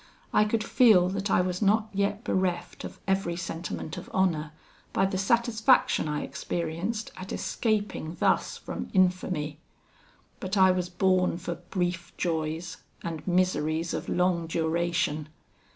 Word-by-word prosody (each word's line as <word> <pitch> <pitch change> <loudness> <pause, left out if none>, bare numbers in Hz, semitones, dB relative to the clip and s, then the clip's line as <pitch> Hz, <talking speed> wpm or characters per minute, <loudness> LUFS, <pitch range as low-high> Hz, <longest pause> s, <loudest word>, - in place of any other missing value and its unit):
I 210 - +5
could 215 +1 0
feel 215 -8 +5
that 195 +1 -2
I 180 - +4
was 180 +1 -2
not 215 +2 +3
yet 200 +2 0
bereft 180 -4 -1
of - - -8
every 190 -3 +1
sentiment 170 -2 -5
of - - -8
honour, 165 -5 +1 0.4
by 190 - +3
the 190 -1 -1
satisfaction 235 - +3
I 150 0 -1
experienced 175 +7 -3
at 185 0 -7
escaping 205 -7 -1
thus - - +2
from - - -6
infamy. 180 -5 +1 0.8
But 195 -1 -2
I 190 -1 +7
was 180 -1 -1
born 185 -1 +2
for 175 0 -4 0.2
brief 175 -1 -2
joys, 160 0 -2 0.3
and 165 -1 -5
miseries 170 -3 +1
of - - -4
long 180 -2 +1
duration. 165 -2 0
180 Hz, 135 wpm, -28 LUFS, 170-195 Hz, 0.8 s, I